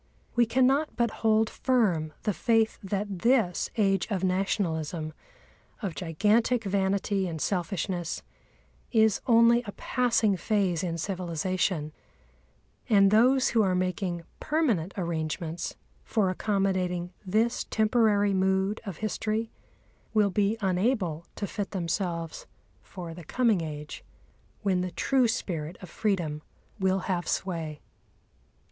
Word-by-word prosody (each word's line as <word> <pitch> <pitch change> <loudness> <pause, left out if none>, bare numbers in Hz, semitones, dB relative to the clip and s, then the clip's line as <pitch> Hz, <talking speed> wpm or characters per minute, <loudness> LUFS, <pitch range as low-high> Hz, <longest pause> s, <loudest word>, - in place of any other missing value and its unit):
We 240 -1 +4
cannot 265 +5 +2
but 235 -2 +1
hold 220 0 +4
firm 200 - +1
the 210 - +1
faith 225 +2 +2
that 200 -1 -3
this 225 -5 +2
Age 195 -3 +2
of 195 -4 -1
Nationalism, 170 -4 -1 0.7
of 190 -4 -2
gigantic 210 +8 +1
vanity 195 0 0
and 160 -2 -4
selfishness, 175 -1 -2 0.7
is 220 -3 +3
only 235 0 +6
a - - -3
passing 230 -5 +1
phase 190 -4 +1
in 170 -2 -2
civilisation, 175 -2 -1 1.0
and 200 -3 +5
those 255 +5 +5
who 230 - +3
are 190 -3 +2
making 180 -1 -1 0.2
permanent 240 - 0
arrangements 165 -1 -3 0.3
for 205 -5 +1
accommodating 185 -3 -1
this 220 +5 +1
temporary 215 -2 +2
mood 190 +2 +1
of 185 -5 -5
history 220 +1 -2 0.6
will 210 -2 +4
be 205 +3 +1
unable 185 - 0
to 205 - -3
fit 200 0 -4
themselves 170 -2 -3 0.3
for 175 -4 -8
the 175 +1 -10
coming 225 0 +2
age, 150 -1 -6 0.6
when 190 -3 +2
the 180 - -2
true 255 +7 +2
spirit 170 -7 -3
of 180 -4 -11
freedom 175 -8 -1 0.4
will 190 0 +2
have 180 -2 -2
sway. 165 -5 -3
195 Hz, 120 wpm, -28 LUFS, 175-220 Hz, 1.0 s, only